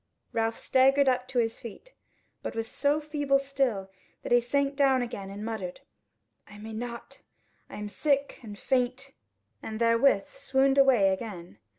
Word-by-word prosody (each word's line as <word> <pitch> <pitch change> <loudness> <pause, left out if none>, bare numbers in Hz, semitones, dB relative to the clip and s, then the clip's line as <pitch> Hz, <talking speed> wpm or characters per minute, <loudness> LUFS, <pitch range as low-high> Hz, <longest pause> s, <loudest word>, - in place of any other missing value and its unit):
Ralph 225 0 0
staggered 270 +2 +3
up 255 -1 +1
to 255 - -5
his 225 -1 0
feet, 240 - -11 0.5
but - - -5
was 225 0 -2
so 285 +5 +1
feeble 290 -2 +1
still, 270 -8 -1 0.3
that - - -6
he 240 0 +6
sank 280 +3 0
down 270 -3 +3
again, 200 -5 -6
and 205 +2 -7
muttered: 205 -6 -5 0.7
"I 205 - -13
may 220 +1 -8
not; 235 +1 -7 0.5
I - - -9
am 210 0 -5
sick 280 +6 0
and 210 -4 -9
faint;" 260 +3 -1 0.5
and 220 0 -6
therewith 230 -2 +3
swooned 270 0 +1
away 250 -8 +5
again. 190 - -5
245 Hz, 160 wpm, -28 LUFS, 220-275 Hz, 0.7 s, he